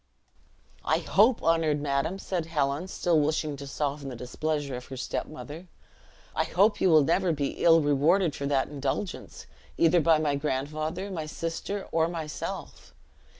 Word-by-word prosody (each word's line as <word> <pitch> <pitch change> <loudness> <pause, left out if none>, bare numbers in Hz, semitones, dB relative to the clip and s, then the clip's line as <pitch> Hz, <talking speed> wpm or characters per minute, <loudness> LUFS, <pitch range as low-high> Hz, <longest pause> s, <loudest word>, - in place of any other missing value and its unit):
"I - - +2
hope, 220 +5 +3
honored 160 -2 +2
madam," 145 +5 -1
said 180 -4 -3
Helen, 150 +1 -1
still 175 -3 +1
wishing 150 0 0
to 140 0 -8
soften 140 0 -3
the 125 - -6
displeasure 140 +3 -3
of 125 0 -7
her 135 - -8
step 125 - -3
mother, 155 +3 -9 0.7
"I - - +2
hope 205 +4 +2
you 190 - +4
will 155 -3 +6
never 175 +4 +2
be 145 -3 -2
ill 165 -1 +7
rewarded 150 +4 +3
for 140 - -3
that 140 -2 +1
indulgence, 145 +6 -4 0.3
either 170 +1 +4
by 160 0 +5
my 155 -2 0
grandfather, 155 +6 -3
my 160 -4 -4
sister, 165 +5 -4
or 160 0 +2
myself. 165 -3 -6
155 Hz, 155 wpm, -27 LUFS, 140-170 Hz, 0.7 s, ill